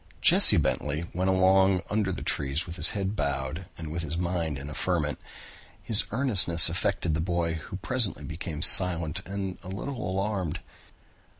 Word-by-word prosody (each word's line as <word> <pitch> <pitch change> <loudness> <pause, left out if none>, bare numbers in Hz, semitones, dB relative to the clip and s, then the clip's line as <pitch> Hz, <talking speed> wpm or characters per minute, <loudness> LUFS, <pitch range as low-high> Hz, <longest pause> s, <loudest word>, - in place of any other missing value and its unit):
Jesse - - +6
Bentley 75 +3 -2
went 95 +2 -1
along 95 0 +2
under 105 -2 -1
the - - -6
trees 70 +4 -2
with 85 - -9
his 80 0 +4
head 100 +1 -3
bowed 70 +3 -4
and 80 -2 -8
with 85 +2 -4
his 80 0 -5
mind 85 -4 -3
in 70 +1 -8
a 75 - -8
ferment. 80 -5 -2 0.6
His 110 -2 +2
earnestness 100 -9 +5
affected 85 - -2
the 80 - -2
boy, 85 -1 -2
who 80 +3 -8
presently 100 - 0
became 80 +1 -6
silent 85 -4 +4
and 95 -1 -6
a 90 - -13
little 100 +5 -6
alarmed. 95 -3 -3
90 Hz, 165 wpm, -26 LUFS, 80-95 Hz, 0.6 s, Jesse